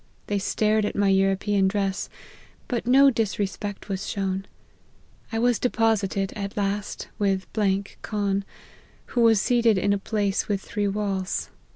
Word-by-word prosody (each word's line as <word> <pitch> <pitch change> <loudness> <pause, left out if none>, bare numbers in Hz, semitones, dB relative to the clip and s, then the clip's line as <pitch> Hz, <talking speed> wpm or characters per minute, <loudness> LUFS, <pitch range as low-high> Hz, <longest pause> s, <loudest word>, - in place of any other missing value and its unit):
They 205 -1 -1
stared 215 +2 +1
at 205 - -2
my 200 -1 +3
European 195 +1 +2
dress, 195 -1 -1 0.6
but 240 -1 -2
no 275 +2 +7
disrespect 205 -3 -2
was 195 0 -3
shown. 195 -1 -2 0.8
I 225 - -2
was 240 0 +2
deposited, 210 -5 +1
at 200 -1 -5
last, 205 0 -2
with 195 -2 +1 0.6
Khan, 200 -2 -1 0.6
who 240 - -1
was 225 -2 +5
seated 235 -1 +3
in 200 +2 +2
a 200 - 0
place 200 -1 -1
with 205 -2 0
three 205 +1 -2
walls. 195 -2 -2
205 Hz, 140 wpm, -25 LUFS, 195-220 Hz, 0.8 s, no